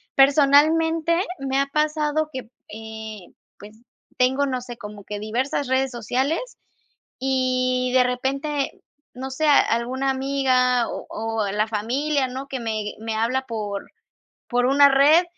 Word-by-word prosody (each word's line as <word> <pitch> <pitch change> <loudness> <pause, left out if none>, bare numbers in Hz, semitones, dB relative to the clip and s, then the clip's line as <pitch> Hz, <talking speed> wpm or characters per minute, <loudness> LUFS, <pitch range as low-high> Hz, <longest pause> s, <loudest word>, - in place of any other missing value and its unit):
personalmente, 315 +4 +4 0.2
me 270 0 -1
ha 275 - +1
pasado 305 +1 0
que, 260 -3 -7 0.2
eh, 220 -2 -8 0.3
pues, 210 +1 -12 0.4
tengo, 265 +3 +2
no 255 -2 -2
sé, 240 -1 -8
como 210 -2 -10
que 205 +1 -6
diversas 250 +6 -2
redes 260 0 +1
sociales, 265 - -2 0.6
y 255 -1 0
de 255 -1 +5
repente, 275 +3 -2 0.3
no 260 +2 -6
sé, 310 +4 -1
a 290 - +7
alguna 255 +4 -1
amiga 260 -2 +1
o - - -6
o 220 -2 -2
la 210 +2 0
familia, 260 +6 -1
¿no?, 265 +2 -6
que 265 -2 -5
me 215 -2 -3
me 225 0 -4
habla 250 +4 0
por 210 -3 -4 0.6
por 245 0 +1
una 280 +2 +6
red, 290 +6 +5
260 Hz, 140 wpm, -23 LUFS, 230-280 Hz, 0.6 s, a